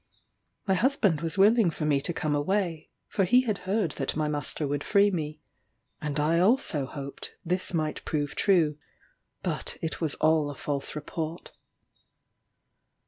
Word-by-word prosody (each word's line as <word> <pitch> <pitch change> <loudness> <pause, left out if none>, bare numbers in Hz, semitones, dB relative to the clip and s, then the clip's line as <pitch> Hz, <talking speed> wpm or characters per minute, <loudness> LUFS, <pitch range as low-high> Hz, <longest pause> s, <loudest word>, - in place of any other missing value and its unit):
My 190 - +2
husband 200 - +2
was 165 +3 -2
willing 210 0 +5
for 155 -1 -4
me 145 -2 +2
to 175 - -2
come 155 -3 -1
away, 165 +1 -1 0.2
for 195 - 0
he 245 +8 +5
had 220 -6 -2
heard 200 -5 +1
that 135 - -2
my 155 0 0
master 145 0 -1
would 145 +1 -2
free 205 0 +4
me, 155 -4 -4 0.6
and 150 -1 -2
I 160 +3 +3
also 180 - +2
hoped 140 0 -7
this 180 +2 -1
might 155 -3 -2
prove 145 -2 -2
true; 160 -7 +2 0.6
but - - -3
it 160 - -4
was 155 -3 0
all 155 -2 +3
a 145 - -6
false 140 +1 -3
report. 160 +2 -5
160 Hz, 155 wpm, -28 LUFS, 150-190 Hz, 0.6 s, willing